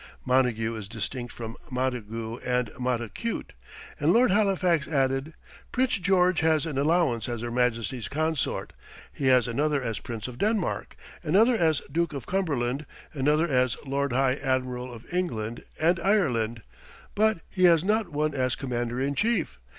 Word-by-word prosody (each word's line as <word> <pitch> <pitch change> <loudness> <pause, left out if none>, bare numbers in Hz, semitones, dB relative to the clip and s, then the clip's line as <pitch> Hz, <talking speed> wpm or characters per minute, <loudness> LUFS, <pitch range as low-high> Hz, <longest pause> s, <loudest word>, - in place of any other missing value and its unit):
Montague 125 -3 +2
is 110 -3 -7
distinct 120 +3 -5
from 115 -1 -7
Montagu 115 -3 -3
and 125 -2 0
Montacute. 125 - -3 0.5
And - - +3
Lord 245 0 +5
Halifax 185 -6 +2
added, 135 +1 0 0.4
"Prince 255 -5 +1
George 180 -1 +3
has 160 -2 +2
an 145 -4 -2
allowance 140 -7 +2
as 120 -2 -3
Her 120 0 -4
Majesty's 120 -1 0
Consort; 155 0 -1 0.4
he 135 - -1
has 125 -2 +5
another 145 +5 +1
as 115 -3 -2
Prince 115 -2 -6
of 125 -1 -9
Denmark; 215 -3 -1 0.3
another 205 +10 +4
as 160 -7 +2
Duke 170 -1 0
of 140 - -5
Cumberland; 145 -7 -1 0.3
another 150 +3 +2
as 130 -4 +2
Lord 140 0 -1
High 130 +1 +2
Admiral 130 -2 -2
of 115 -1 -11
England 120 -11 -2 0.2
and 170 +2 +3
Ireland; 125 - +1 0.5
but 215 -3 +2
he 185 -1 +2
has 170 -2 +6
not 215 +2 +1
one 150 0 -1
as 130 -2 0
Commander 120 -2 -3
in 140 +2 0
Chief. 215 - 0
135 Hz, 150 wpm, -27 LUFS, 120-170 Hz, 0.5 s, has